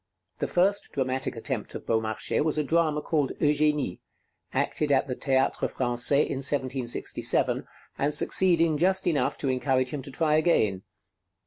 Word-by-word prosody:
The - - -1
first 195 +3 0
dramatic 130 -1 -2
attempt - - -4
of - - -7
Beaumarchais 110 -1 -1
was 155 -1 -1
a 150 - +1
drama 155 0 +1
called 150 -5 0
'Eugénie,' 150 - +1 0.5
acted 150 -2 -1
at 135 - +3
the 130 -3 -4
Théâtre 135 -1 0
Français 125 +3 +1
in - - -4
1767, 130 -3 0 0.3
and 145 +2 +1
succeeding 165 -2 +3
just 190 +2 +2
enough 160 -5 0
to 140 - -3
encourage 130 0 0
him 145 - -4
to 135 - -9
try 155 +2 +1
again. 110 - +2
145 Hz, 145 wpm, -26 LUFS, 130-155 Hz, 0.5 s, at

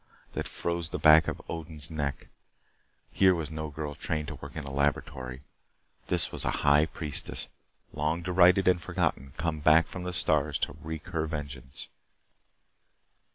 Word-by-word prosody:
that - - -3
froze 85 -1 -2
the - - -3
back 75 0 +7
of - - -3
Odin's 80 -1 -4
neck. 70 -3 -3 0.8
Here 95 -1 +4
was 80 -3 -4
no 80 0 -4
girl 75 0 -5
trained 75 +1 -3
to - - -6
work - - -9
in 80 - -4
a 70 - -7
laboratory. 70 -2 -2 0.6
This - - +2
was - - +1
a - - +1 0.2
high 75 +2 +5
priestess, 75 -2 -1 0.4
long 80 +3 -1
derided 90 +1 +5
and 90 -2 +4
forgotten, 80 -7 -2
come 80 -2 -1
back 80 +2 +5
from 90 - -7
the 90 - -3
stars 75 -4 +1
to 70 - -2
wreak 80 +1 -6
her 80 -3 -1
vengeance. 70 -4 -6
80 Hz, 155 wpm, -29 LUFS, 75-85 Hz, 0.8 s, back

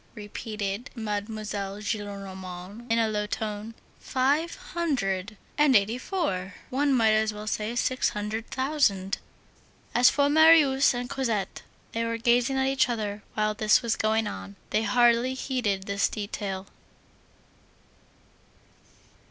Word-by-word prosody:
repeated 210 0 -5
Mademoiselle 210 -2 -4
Gillenormand, 200 0 -6
in 230 - +3
a 225 -1 +3
low 210 -1 -1
tone. 215 +1 -4 0.2
"Five 285 +6 0 0.2
hundred 220 - -1 0.2
and 295 -3 +5
eighty 215 +4 +3
four! 200 - -2 0.2
one 280 +2 +2
might 230 -4 +4
as 215 0 +2
well 210 0 -8
say 215 +2 -2
six 255 +2 +1
hundred 215 +1 -4
thousand!" 260 -9 0 0.7
As 245 +1 +6
for 285 0 +2
Marius 295 -4 +6
and 245 0 -3
Cosette, 230 -7 -2 0.3
they 230 - -1
were 230 0 -1
gazing 245 +3 +2
at 265 - +2
each 270 -1 +2
other 210 -3 -3
while 215 0 +1
this 215 +4 +3
was 230 -2 +1
going 220 0 +1
on; 95 - -6 0.2
they 215 - +2
hardly 240 +3 +3
heeded 240 -8 -1
this 200 +1 0
detail. 200 -2 -4
220 Hz, 125 wpm, -27 LUFS, 205-255 Hz, 0.7 s, As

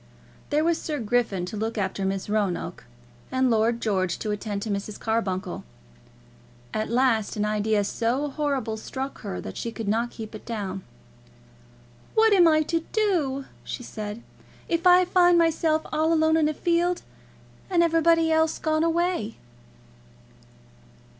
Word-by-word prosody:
There 300 +1 +2
was 335 0 +1
Sir 305 -2 -3
Griffin 220 -5 0
to 180 - -6
look 220 +2 -3
after 195 -1 -1
Miss 195 0 -2
Roanoke, 200 - -2 0.5
and 260 -1 +2
Lord 230 +1 +2
George 190 -6 0
to 215 - -3
attend 205 -1 -3
to 220 - -3
Mrs. 200 +1 -4
Carbuncle. 195 -5 -2 1.1
At 215 0 -2
last 235 -3 +2
an 210 -1 0
idea 210 0 +1
so 240 +7 -1
horrible 275 -6 -2
struck 265 +5 -6
her 90 - -5
that 95 - -8
she 230 - -3
could 225 -2 -6
not 230 +3 +1
keep 220 -2 -9
it 215 - -9
down. 200 -5 -4 1.3
"What 445 -1 +5
am 355 -4 +6
I 310 -1 +4
to 330 +2 0
do," 325 - 0 0.2
she 250 - -6
said, 215 0 -6 0.4
"if 340 +2 +1
I 360 0 +7
find 355 -1 +4
myself 320 -1 +2
all 315 +1 +2
alone 315 -1 +3
in 310 -2 +3
a - - -1
field, 345 +2 +1 0.7
and 350 -2 +3
everybody 330 0 +3
else 320 0 +2
gone 310 0 0
away!" 335 - 0
245 Hz, 150 wpm, -25 LUFS, 210-325 Hz, 1.3 s, I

